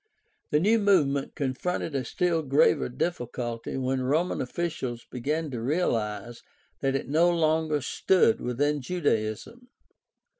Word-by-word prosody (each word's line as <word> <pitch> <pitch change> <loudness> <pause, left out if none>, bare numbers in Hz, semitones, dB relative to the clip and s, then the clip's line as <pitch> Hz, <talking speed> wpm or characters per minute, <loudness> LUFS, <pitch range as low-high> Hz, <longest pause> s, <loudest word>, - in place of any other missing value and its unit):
— - - -46
The 150 - +3
new 215 +7 +3
movement 150 -10 +2
con 135 -4 -1
fronted 180 +2 -3
a 135 -2 -1
still 170 +6 0
graver 140 -3 +3
difficulty 120 -5 -3
when 130 0 -1
Roman 155 +8 0
officials 130 -4 -4
began 150 +5 -2
to 120 -3 -4
realize 120 -5 -1 0.4
that 135 -1 0
it 135 - -2
no 160 +5 +4
longer 160 -3 +1
stood 190 - +2
within 145 +4 0
Judaism. 145 - -2
145 Hz, 135 wpm, -27 LUFS, 125-170 Hz, 0.4 s, no